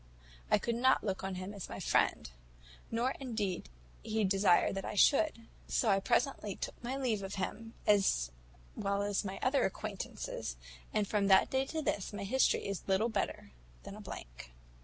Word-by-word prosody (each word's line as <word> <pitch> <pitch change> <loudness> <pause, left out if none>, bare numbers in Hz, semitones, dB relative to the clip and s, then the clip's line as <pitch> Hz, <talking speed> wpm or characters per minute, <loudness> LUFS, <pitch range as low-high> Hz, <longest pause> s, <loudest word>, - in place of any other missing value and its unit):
I - - +5
could 235 - -1
not 260 +3 +3
look 195 -3 -2
on 190 -1 -3
him 185 +2 -5
as 200 -3 -7
my - - -6
friend, - - +2 0.6
nor 235 +3 +1
indeed 215 - -3 0.3
did - - -9
he 220 0 +1
desire 195 -2 +4
that 195 0 -3
I - - -4
should; 275 +1 +4 0.2
so 230 - +1
I 195 - +4
presently 210 -2 0
took - - -6
my 255 +3 -2
leave 240 -7 0
of 195 0 -5
him, 225 +4 -4
as 190 - +3 0.4
well 200 0 0
as 205 -1 0
of - - -1
my 190 0 -4
other 270 +2 +3
acquaintance; - - -3 0.6
and 210 -2 +1
from 205 -1 +1
that 190 -1 +5
day 265 0 +1
to 315 +1 -3
this, 205 -7 -1
my 205 -1 -4
history 260 +7 +2
is 200 -2 -3
little 195 +4 +2
better 205 - -2 0.3
than - - -8
a - - -9
blank." - - -9
205 Hz, 185 wpm, -33 LUFS, 195-235 Hz, 0.6 s, I